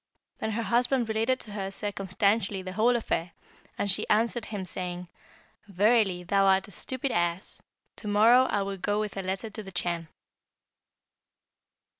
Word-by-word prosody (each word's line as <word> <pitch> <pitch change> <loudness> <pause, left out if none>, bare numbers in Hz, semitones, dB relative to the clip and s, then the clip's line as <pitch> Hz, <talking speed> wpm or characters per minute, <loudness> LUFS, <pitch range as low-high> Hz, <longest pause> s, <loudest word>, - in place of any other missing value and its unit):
Then 220 - -2
her 230 +2 -1
husband 240 +3 +2
related 225 +4 +1
to 215 - -6
her 195 -2 -3
circumstantially 200 0 -1
the 185 - -5
whole 230 +5 +3
affair, 175 -7 -2 0.4
and 200 - +1
she - - 0
answered 225 +1 +2
him 205 -3 -5
saying, 180 0 -5 0.6
'Verily, 200 -2 +2
thou 195 +2 +2
art 190 +1 +3
a - - -13
stupid 260 +7 -3
ass. 175 +1 0 0.4
To 210 - -7
morrow 225 +5 +6
I 205 -5 0
will 195 0 -4
go 205 +3 -1
with 215 -1 -3
a 195 - -2
letter 195 +4 -4
to 215 - -4
the 195 -2 -10
Chan.' 170 -2 -2
205 Hz, 160 wpm, -28 LUFS, 190-225 Hz, 0.6 s, morrow